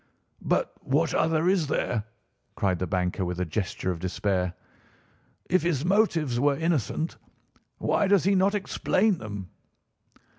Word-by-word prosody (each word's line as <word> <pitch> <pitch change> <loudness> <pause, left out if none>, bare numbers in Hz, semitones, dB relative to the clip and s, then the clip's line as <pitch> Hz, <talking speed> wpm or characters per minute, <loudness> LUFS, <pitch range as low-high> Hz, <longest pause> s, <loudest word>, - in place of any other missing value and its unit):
"But - - 0
what 150 +4 +1
other 160 +1 +2
is 180 -5 +2
there?" 115 -6 -1 0.5
cried 95 -3 0
the 90 - -2
banker 90 +2 -1
with 90 0 -3
a 90 - 0
gesture 95 +1 -2
of 85 - -5
despair. 90 0 -1 0.9
"If 185 0 +3
his 160 -3 0
motives 170 - +2
were 140 +1 +2
innocent, 160 -1 -1 0.6
why 205 - +1
does 200 -2 +4
he 195 - +3
not 195 +2 +3
explain 205 -1 +1
them?" 100 -4 -7
145 Hz, 140 wpm, -27 LUFS, -, 0.9 s, does